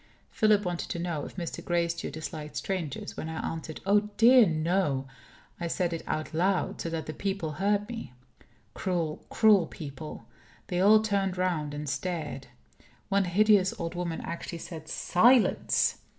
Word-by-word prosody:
Philip 210 Hz, -2 st, +3 dB
wanted 175 Hz, -1 st, -3 dB
to -, -, -3 dB
know 170 Hz, -4 st, -3 dB
if -, -, -10 dB
Mr. 175 Hz, -2 st, -5 dB
Gracedieu 170 Hz, -1 st, -1 dB
disliked 155 Hz, -2 st, -7 dB
strangers. 175 Hz, -8 st, -4 dB
When 160 Hz, -, -5 dB
I 160 Hz, -, -3 dB
answered, 160 Hz, -1 st, -7 dB
"Oh 205 Hz, +1 st, +3 dB
dear, 240 Hz, -1 st, +7 dB
no!" 155 Hz, -4 st, 0 dB, 0.5 s
I 170 Hz, -, -2 dB
said 175 Hz, 0 st, -1 dB
it 165 Hz, -, -3 dB
out 155 Hz, 0 st, -3 dB
loud, 185 Hz, +3 st, 0 dB
so 165 Hz, -, -3 dB
that 165 Hz, -1 st, -3 dB
the 155 Hz, -, -5 dB
people 195 Hz, -5 st, -2 dB
heard 205 Hz, +1 st, +2 dB
me. 225 Hz, -, -7 dB, 0.6 s
Cruel, 170 Hz, -5 st, -2 dB
cruel 210 Hz, -6 st, +5 dB
people! 150 Hz, +1 st, -8 dB, 0.4 s
They 180 Hz, 0 st, 0 dB
all 215 Hz, +2 st, +6 dB
turned 195 Hz, -3 st, 0 dB
round 160 Hz, -5 st, -1 dB
and 150 Hz, 0 st, -5 dB
stared. 150 Hz, -1 st, -3 dB, 0.6 s
One 200 Hz, 0 st, +2 dB
hideous 200 Hz, +1 st, +4 dB
old 170 Hz, 0 st, -3 dB
woman 175 Hz, -2 st, -3 dB
actually 170 Hz, 0 st, -5 dB
said, 160 Hz, -1 st, -8 dB
"Silence!" 235 Hz, +6 st, +3 dB
175 Hz, 155 wpm, -28 LUFS, 160-200 Hz, 0.6 s, dear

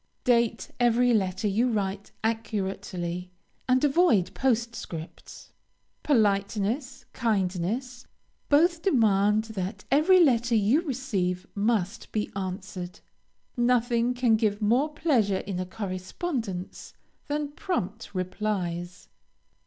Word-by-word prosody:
Date 235 Hz, -2 st, +1 dB
every 245 Hz, 0 st, +4 dB
letter 190 Hz, -1 st, 0 dB
you 230 Hz, +5 st, +2 dB
write 200 Hz, -2 st, -2 dB
accurately, 195 Hz, -5 st, -3 dB, 0.4 s
and 255 Hz, +2 st, +3 dB
avoid 275 Hz, -, +3 dB
postscripts. 230 Hz, -10 st, -3 dB, 0.5 s
Politeness, 220 Hz, +2 st, 0 dB
kindness, 225 Hz, +3 st, -1 dB, 0.4 s
both 330 Hz, +3 st, +4 dB
demand 215 Hz, -, +3 dB
that 210 Hz, -2 st, -5 dB
every 320 Hz, +7 st, +5 dB
letter 240 Hz, -7 st, +3 dB
you 220 Hz, +9 st, +3 dB
receive 210 Hz, -, -2 dB
must 210 Hz, 0 st, -1 dB
be 215 Hz, -1 st, -2 dB
answered. 185 Hz, -1 st, -5 dB, 0.6 s
Nothing 240 Hz, 0 st, +2 dB
can 240 Hz, -3 st, +3 dB
give 210 Hz, -2 st, 0 dB
more 240 Hz, +8 st, +2 dB
pleasure 260 Hz, -, +1 dB
in 190 Hz, -2 st, -4 dB
a 185 Hz, -, -3 dB
correspondence, 195 Hz, -, -5 dB, 0.3 s
than 290 Hz, 0 st, -2 dB
prompt 225 Hz, -, -3 dB
replies. 185 Hz, -2 st, -3 dB
220 Hz, 100 wpm, -27 LUFS, 195-250 Hz, 0.6 s, every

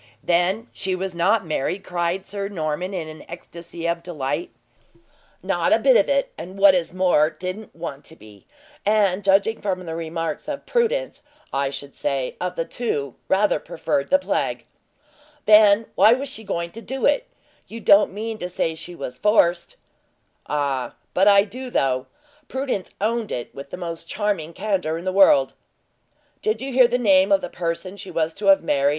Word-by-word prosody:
"Then 180 Hz, +6 st, +1 dB
she 190 Hz, -1 st, -2 dB
was 190 Hz, 0 st, -4 dB
not 190 Hz, +4 st, +2 dB
married?" 160 Hz, +5 st, -2 dB
cried 175 Hz, +2 st, -2 dB
Sir 200 Hz, -1 st, -4 dB
Norman, 175 Hz, -1 st, -3 dB
in 175 Hz, -5 st, -4 dB
an 155 Hz, 0 st, -10 dB
ecstasy 170 Hz, 0 st, -7 dB
of 170 Hz, 0 st, -1 dB
delight. 170 Hz, -, -3 dB, 0.9 s
"Not -, -, 0 dB
a -, -, +6 dB
bit -, -, +4 dB
of -, -, +4 dB
it; 275 Hz, -1 st, +1 dB
and 180 Hz, +4 st, -8 dB
what 195 Hz, -1 st, +7 dB
is 175 Hz, -3 st, 0 dB
more, 180 Hz, -4 st, +3 dB
didn't 185 Hz, +6 st, -6 dB
want 160 Hz, -4 st, -6 dB
to 160 Hz, -, -13 dB
be; 105 Hz, -, -17 dB, 0.4 s
and 205 Hz, -2 st, +2 dB
judging 200 Hz, +3 st, +2 dB
from 185 Hz, -3 st, -2 dB
the 165 Hz, -, -5 dB
remarks 165 Hz, -, -4 dB
of 290 Hz, -2 st, -5 dB
Prudence, -, -, 0 dB, 0.3 s
I 135 Hz, 0 st, 0 dB
should 140 Hz, 0 st, -8 dB
say, 135 Hz, -2 st, -2 dB
of 180 Hz, 0 st, -2 dB
the 165 Hz, -, -2 dB
two, 145 Hz, -, -3 dB
rather 195 Hz, -3 st, +2 dB
preferred 140 Hz, -3 st, -2 dB
the 280 Hz, -, +6 dB
plague." 280 Hz, -, -2 dB, 0.8 s
"Then 210 Hz, 0 st, +6 dB
why 220 Hz, -, +6 dB
was 275 Hz, +1 st, -4 dB
she 225 Hz, -5 st, -8 dB
going 170 Hz, -4 st, -3 dB
to 230 Hz, -, -9 dB
do 265 Hz, +3 st, -3 dB
it? -, -, +2 dB, 0.4 s
You 230 Hz, -, -8 dB
don't 205 Hz, -2 st, +5 dB
mean 220 Hz, +2 st, -5 dB
to 180 Hz, -, -4 dB
say 165 Hz, -2 st, -1 dB
she 175 Hz, +2 st, -8 dB
was 125 Hz, -4 st, -7 dB
forced?" 180 Hz, -5 st, +2 dB, 0.7 s
"Ah, 140 Hz, -4 st, -1 dB, 0.2 s
but 190 Hz, +2 st, +3 dB
I 200 Hz, -1 st, +7 dB
do, 255 Hz, +5 st, -8 dB
though! 130 Hz, -, 0 dB, 0.4 s
Prudence 260 Hz, -8 st, -3 dB
owned 225 Hz, +1 st, -1 dB
it 120 Hz, -, -5 dB
with 140 Hz, 0 st, -9 dB
the -, -, -6 dB
most 170 Hz, -2 st, -6 dB
charming 200 Hz, -7 st, -2 dB
candor 185 Hz, -4 st, -1 dB
in 170 Hz, -, -8 dB
the 185 Hz, -, -1 dB
world." 165 Hz, -9 st, +5 dB, 0.9 s
"Did 435 Hz, 0 st, 0 dB
you 270 Hz, 0 st, -5 dB
hear 255 Hz, -1 st, +6 dB
the 245 Hz, -, 0 dB
name 195 Hz, -4 st, +4 dB
of 195 Hz, -1 st, +4 dB
the -, -, -5 dB
person 175 Hz, +3 st, -4 dB
she 195 Hz, 0 st, -9 dB
was 160 Hz, 0 st, -1 dB
to 200 Hz, +3 st, -4 dB
have 195 Hz, -2 st, +6 dB
married?" 140 Hz, -3 st, +2 dB
185 Hz, 180 wpm, -22 LUFS, 165-210 Hz, 0.9 s, what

